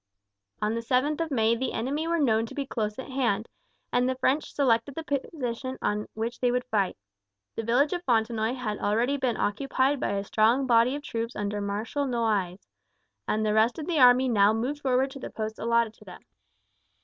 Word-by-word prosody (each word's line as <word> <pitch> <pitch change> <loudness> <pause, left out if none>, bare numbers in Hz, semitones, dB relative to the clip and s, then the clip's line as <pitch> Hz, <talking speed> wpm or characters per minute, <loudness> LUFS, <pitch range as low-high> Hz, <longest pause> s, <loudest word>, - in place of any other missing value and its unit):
On 210 +1 +1
the 230 - -2
7th 265 +7 +1
of 330 - -1
May 230 -4 +2
the 260 +3 -3
enemy 280 +8 -2
were 335 0 +1
known 225 -7 +2
to - - -11
be 280 - -2
close 215 -5 -3
at 265 +1 -7
hand, 235 -5 0 0.5
and 250 +1 +2
the 260 - -1
French 270 +3 0
selected 260 -1 +1
the 325 - -4
position 260 -3 -3
on 210 0 -1
which 230 +2 -3
they 250 - +2
would 250 +1 0
fight. 200 -4 +1 0.6
The - - -2
village 245 +8 +2
of 350 0 -3
Fontenoy 225 0 +1
had 215 -5 -4
already 235 +7 +1
been 255 -4 -1
occupied 265 +5 0
by - - -1
a 200 0 -1
strong 225 +6 +2
body 240 +1 +4
of 290 - -6
troops 230 -4 -4
under 205 0 -2
Marshal 215 +8 -2
Noailles, 210 -7 -1 0.6
and 215 0 0
the 210 - +1
rest 220 +2 +3
of 310 - -5
the 330 -3 0
army 250 +1 +6
now 210 -3 +4
moved 260 +7 -2
forward 265 0 +1
to 275 - -9
the - - -6
posts 220 0 -5
allotted 235 -1 +1
to 210 - -19
them. 180 - -11
235 Hz, 200 wpm, -27 LUFS, 220-270 Hz, 0.6 s, army